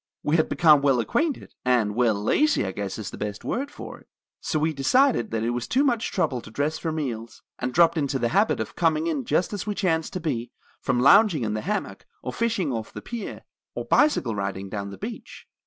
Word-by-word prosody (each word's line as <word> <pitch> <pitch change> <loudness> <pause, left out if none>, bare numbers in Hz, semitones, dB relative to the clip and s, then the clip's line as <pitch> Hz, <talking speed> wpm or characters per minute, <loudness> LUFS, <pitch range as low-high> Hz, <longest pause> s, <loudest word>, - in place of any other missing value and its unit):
We 150 - +1
had 155 - +1
become 155 -3 +5
well 135 -3 +3
acquainted, 290 - -1
and 120 -5 +2
well, 115 -1 +2
lazy 280 - +2
I 95 - -2
guess 100 0 -4
is 105 -3 -6
the - - -9
best 105 0 -4
word 275 +3 -2
for - - -9
it. - - -23 0.3
So 155 - -2
we 155 +1 +1
decided 245 - +3
that 110 -1 -2
it 115 - 0
was 120 0 -3
too 265 +3 +2
much 240 -6 0
trouble 125 -3 0
to - - -12
dress 145 +7 -2
for 165 - -2
meals, 120 -8 -5 0.2
and 125 +1 -2
dropped 165 +2 +4
into 140 -2 0
the 120 -2 0
habit 200 - +2
of - - -4
coming 160 -2 +1
in 150 -6 -1
just 175 +7 0
as 205 0 -4
we 210 - -1
chanced 165 -5 0
to 185 - -2
be, 130 -8 -3 0.3
from 125 -2 0
lounging 170 - +6
in 105 -1 -1
the 110 - -2
hammock, 210 +3 -4 0.2
or - - -4
fishing 215 - 0
off 110 -2 -4
the - - -9
pier, 235 -3 -6 0.3
or - - -4
bicycle 290 - +3
riding 95 -1 -4
down 100 -1 -4
the 100 - -9
beach. 225 +3 -8
145 Hz, 225 wpm, -25 LUFS, 115-190 Hz, 0.3 s, lounging